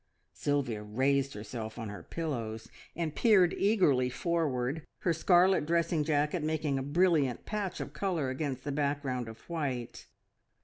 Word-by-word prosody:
Sylvia 135 -7 -1
raised 135 +6 +1
herself 110 +1 -6
on 115 -3 -5
her 100 - -7
pillows 115 -9 -4 0.3
and 160 -2 -2
peered 195 -7 +5
eagerly 165 - +3
forward, 150 -2 -1 0.2
her 170 - +2
scarlet 175 0 +4
dressing 170 -1 +2
jacket 150 +2 +1
making 155 -3 0
a - - -2
brilliant 145 -3 +2
patch 205 -4 -3
of - - -6
colour 170 -9 -1
against 130 -1 -3
the 145 - -3
background 140 -4 -1
of 110 0 -11
white. 140 -8 -4
145 Hz, 140 wpm, -31 LUFS, 125-170 Hz, 0.3 s, peered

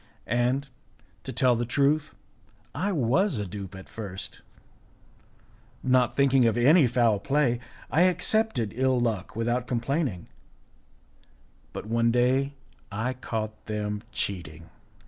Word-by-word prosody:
And, 125 +4 0 0.5
to - - -6
tell 125 -2 +3
the 120 - -1
truth, 145 +5 +1 0.6
I 200 +2 -1
was 150 - +2
a 105 - -2
dupe 95 0 -7
at 95 - -10
first; 100 -4 -7 1.4
not 130 -2 +3
thinking 135 -3 +4
of 115 - +1
any 145 +4 +6
foul 115 -4 +2
play, 135 0 +1 0.3
I 160 - +3
accepted 185 - +1
ill 130 0 +2
luck 110 -5 -2
without 120 +2 -1
complaining; 125 - -1 1.4
but - - -7
one 115 +1 +2
day 130 +4 +2 0.4
I 110 +5 -2
caught 110 -4 -5
them 105 -1 -3
cheating. 85 -4 -4
120 Hz, 120 wpm, -27 LUFS, 110-135 Hz, 1.4 s, any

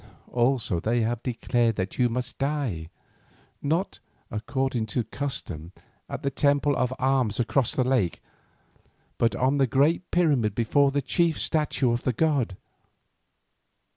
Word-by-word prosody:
Also 120 -6 +1
they 115 +6 +1
have 115 +1 -1
declared 120 -2 0
that 95 +3 -4
you 125 -1 +4
must 125 +1 -4
die, 135 - -2 0.7
not, 165 +7 -1 0.3
according 125 +1 -1
to 115 +3 -1
custom, 90 - -5 0.4
at - - -5
the 140 - 0
Temple 145 +1 +2
of 125 -1 0
Arms 130 -5 +1
across 120 +1 +1
the 130 - +2
lake, 125 -10 +1 1.0
but 115 - +2
on 135 +3 +1
the 135 - +4
great 150 +9 +2
pyramid 140 - +2
before 140 +5 +3
the 140 0 -1
chief 165 +3 +1
statue 150 -5 +1
of 120 +1 0
the 130 - 0
god. 135 - +1
125 Hz, 140 wpm, -26 LUFS, 115-140 Hz, 1.0 s, you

